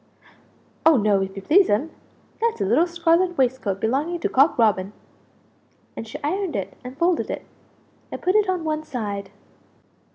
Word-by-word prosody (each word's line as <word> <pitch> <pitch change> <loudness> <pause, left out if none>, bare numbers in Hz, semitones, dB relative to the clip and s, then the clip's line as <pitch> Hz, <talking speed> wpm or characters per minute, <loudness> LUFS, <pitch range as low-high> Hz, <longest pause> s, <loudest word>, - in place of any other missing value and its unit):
"Oh 320 -3 +6
no, 205 -3 +2
if 195 0 -4
you 195 - -7
please'm; 320 - +3 0.5
that's 465 - 0
a 200 - 0
little 260 - +3
scarlet 345 +1 +1
waist 260 0 +1
coat 195 -2 -2
belonging 285 - -1
to - - 0
Cock 275 +5 +3
Robin!" 205 -4 +2 1.0
And 225 - -7
she 220 - -7
ironed 365 - -2
it 195 - -4
and 255 +2 -9
folded 340 +1 +1
it, - - -5 0.7
and - - -5
put 370 - +1
it 420 -2 +3
on 365 -3 -1
one 310 -1 -2
side. 205 -9 -5
280 Hz, 165 wpm, -23 LUFS, 210-345 Hz, 1.0 s, Oh